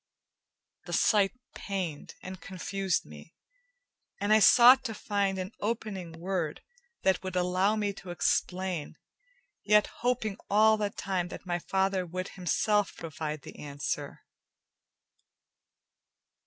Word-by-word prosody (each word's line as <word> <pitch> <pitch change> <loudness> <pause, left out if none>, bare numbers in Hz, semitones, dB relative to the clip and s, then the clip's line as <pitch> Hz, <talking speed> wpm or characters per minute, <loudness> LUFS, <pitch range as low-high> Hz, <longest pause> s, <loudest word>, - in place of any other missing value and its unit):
The - - -5
sight 205 -3 +3 0.2
pained 185 -7 -5
and 185 0 -8
confused 190 0 -2
me, 75 - -13 0.8
and 205 +1 +2
I 215 - +7
sought 245 +6 +8
to 225 -3 -3
find 200 -2 -1
an 185 +1 -4
opening 205 -6 -3
word 170 -2 -3 0.4
that 190 -1 +2
would 185 -1 -5
allow 185 +3 +2
me 205 -2 -1
to 190 - -11
explain, 180 -1 -1 0.7
yet 210 0 +5 0.2
hoping 235 -4 0
all 220 +2 +5
the 210 -1 -1
time 190 -3 -2
that 180 - -9
my 175 -1 -1
father 190 +1 0
would 185 +2 -5
himself 205 +2 0
provide 155 -2 -5
the - - -11
answer. 145 0 -4
190 Hz, 120 wpm, -29 LUFS, 175-205 Hz, 0.8 s, sought